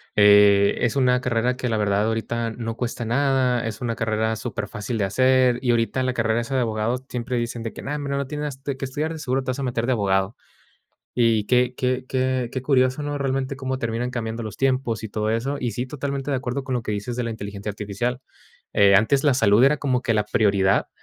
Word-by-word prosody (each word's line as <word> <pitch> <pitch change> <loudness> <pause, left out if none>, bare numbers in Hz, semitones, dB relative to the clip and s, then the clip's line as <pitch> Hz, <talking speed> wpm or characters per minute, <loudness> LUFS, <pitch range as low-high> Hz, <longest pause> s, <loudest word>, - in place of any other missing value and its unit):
eh, 100 -1 +6
es 120 0 +1
una 125 -2 +3
carrera 125 0 0
que, 125 - -2
la 110 - 0
verdad, 105 0 +1
ahorita 115 +1 -2
no 115 0 -5
cuesta 120 -1 -3
nada, 125 -1 +1
es 110 -1 -6
una 115 -2 -2
carrera 110 0 0
superfácil 105 +3 -4
de 105 - 0
hacer. 130 +4 +3
Y 125 - +2
ahorita, 120 +2 +1
la 130 0 0
carrera, 115 -1 +1
esa 135 +3 -4
de 130 - +2
abogados, 115 +2 -1
siempre 125 +1 -3
dicen 120 0 -3
de 115 - -5
que, - - -9
no, 145 - -3
hombre, 145 -1 -3
no 140 0 -1
tienes, 150 0 -4
este, 135 0 -5
qué 135 - -4
estudiar, 150 +5 -3
de 160 - -7
seguro 130 -1 -1
te 130 - -5
vas 130 - -5
a - - -2
meter 120 -2 -1
de 130 - 0
abogado. 100 -2 +1 0.8
Y 115 -3 +3
qué 125 +1 +2
qué 125 0 -1
qué 130 -2 -1
qué 130 - -2
curioso, 130 +1 +2
¿no? 145 0 -3
Realmente 135 -1 -2
cómo 130 -1 -3
terminan 120 +1 -2
cambiando 115 -1 -4
los 110 -2 -7
tiempos 130 -5 0
y 110 - -5
todo 105 +1 -2
eso. 120 +6 -1
Y 125 -3 -2
sí, 125 +2 -3
totalmente 140 0 -4
de 135 - +1
acuerdo 130 +2 -3
con 130 -1 -3
lo 120 - -1
que 105 - -3
dices 105 +4 -4
de 125 - -1
la 115 - -3
inteligencia 100 -1 -6
artificial, 105 +5 -3 0.5
eh, 100 -1 +6
antes 135 +8 +2
la 145 - +5
salud 120 -2 +4
era 150 +2 +4
como 130 -3 0
que 115 - +1
la 105 -1 +1
prioridad 100 -3 +2
125 Hz, 230 wpm, -23 LUFS, 110-130 Hz, 0.8 s, eh